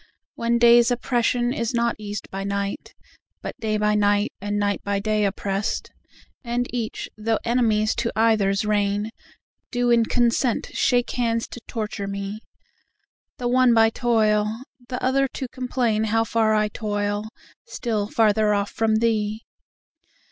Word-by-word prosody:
When 235 0 0
day's 235 0 +6
oppression 245 0 0
is 235 -2 -2
not 235 -1 +1
eas'd 205 -1 -6
by 195 0 -4
night, 200 0 -4 0.5
But - - -5
day 215 -1 -1
by 210 0 +2
night 205 0 +2
and 205 +1 -2
night 205 -1 0
by 200 0 -1
day 210 0 +1
oppress'd, 195 0 -2 0.5
And 240 0 -1
each, 235 -3 -3
though 220 +1 +1
enemies 225 -3 +2
to 235 -1 0
either's 215 -3 +2
reign, 205 0 0 0.6
Do 245 -1 +1
in 230 -1 +4
consent 240 0 +1
shake 245 -1 +1
hands 230 -2 0
to 240 - -9
torture 210 -3 -4
me, 200 +1 -5 1.0
The 245 - -2
one 250 -1 +4
by 225 0 +5
toil, 220 -1 +1 0.3
the 250 - -3
other 270 +1 +2
to 260 - -4
complain 245 -4 -1
How 225 +1 +2
far 220 -1 +2
I 215 0 +2
toil, 205 -1 -2 0.4
still 220 - -2
farther 215 -1 +3
off 200 0 -1
from 220 -1 +1
thee. 220 -1 0
220 Hz, 145 wpm, -23 LUFS, 205-235 Hz, 1.0 s, day's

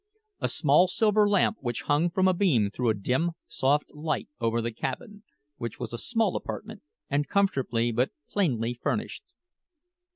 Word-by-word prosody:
A - - 0
small 155 +3 +4
silver 210 +2 +3
lamp 205 +2 +3
which 120 -3 -3
hung 150 +4 +2
from 190 +2 +2
a 185 - +4
beam 140 - +2
threw 120 +2 0
a 110 - +2
dim, 130 - 0
soft 145 +3 0
light 150 -1 -3
over 115 0 +1
the 115 0 -2
cabin, 205 - -5 0.4
which 115 -3 -6
was 120 -2 -5
a - - -3
small 225 -5 0
apartment, 220 -1 -6 0.3
and 145 +1 0
comfortably 130 - +1
but 125 +3 +1 0.2
plainly 120 - 0
furnished. 120 - -3
145 Hz, 160 wpm, -27 LUFS, 120-195 Hz, 0.4 s, small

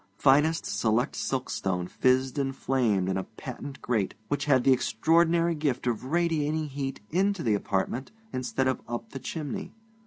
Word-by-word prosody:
Finest 150 +6 +4
selected 110 +4 0
silkstone 100 -9 -1
fizzed 130 +6 +2
and 135 -1 -1
flamed 115 -10 +1
in 95 0 0
a 95 - -1
patent 130 +5 -8
grate 110 -6 0
which 145 - 0
had 130 -4 +4
the 135 - +6
extraordinary 165 +8 +3
gift 145 -6 -1
of 120 0 -1
radiating 155 0 +1
heat 135 -1 -4
into 195 +1 +1
the 110 - +2
apartment 100 +5 -1 0.2
instead 130 +1 -1
of 130 - 0
up 120 0 -5
the 135 - -6
chimney. 155 - -5
135 Hz, 155 wpm, -28 LUFS, 120-150 Hz, 0.2 s, the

